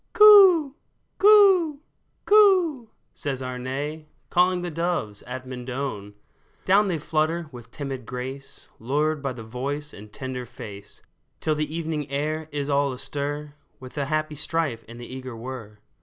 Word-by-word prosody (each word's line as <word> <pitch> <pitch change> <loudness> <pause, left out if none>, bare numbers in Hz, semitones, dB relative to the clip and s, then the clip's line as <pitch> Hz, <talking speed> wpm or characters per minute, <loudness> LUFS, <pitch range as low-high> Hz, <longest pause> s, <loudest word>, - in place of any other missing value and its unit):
*' - - -47
Coo! 390 -9 +8 0.5
coo! 390 -7 +6 0.5
coo! 370 - +4
" - - -46
says 135 -2 -4
Arne, 135 +5 -4 0.2
Calling 180 0 +3
the 175 - -3
doves 165 - -2
at 130 +1 -6
Mendon! 125 -5 -5 0.5
Down 200 +2 +4
they 175 -4 0
flutter 155 +2 -1
with 120 -2 -11
timid 135 -3 -6
grace, 130 +2 -7
Lured 150 +5 0
by 135 -2 -2
the 115 -2 -9
voice 140 +6 -4
and 105 +1 -11
the - - -25
tender 125 +1 -5
face, 105 -5 -11 0.4
Till 155 - 0
the 150 0 -2
evening 155 -3 -3
air 155 +3 -2
is 145 -1 -3
all 140 -1 +2
astir 145 +3 -4 0.3
With 130 -1 -11
the 145 -2 -2
happy 155 0 -1
strife 150 -5 -2
and 115 +1 -11
the 120 - -8
eager 130 -1 -8
whir. 115 -3 -8
145 Hz, 155 wpm, -25 LUFS, 125-165 Hz, 0.5 s, Coo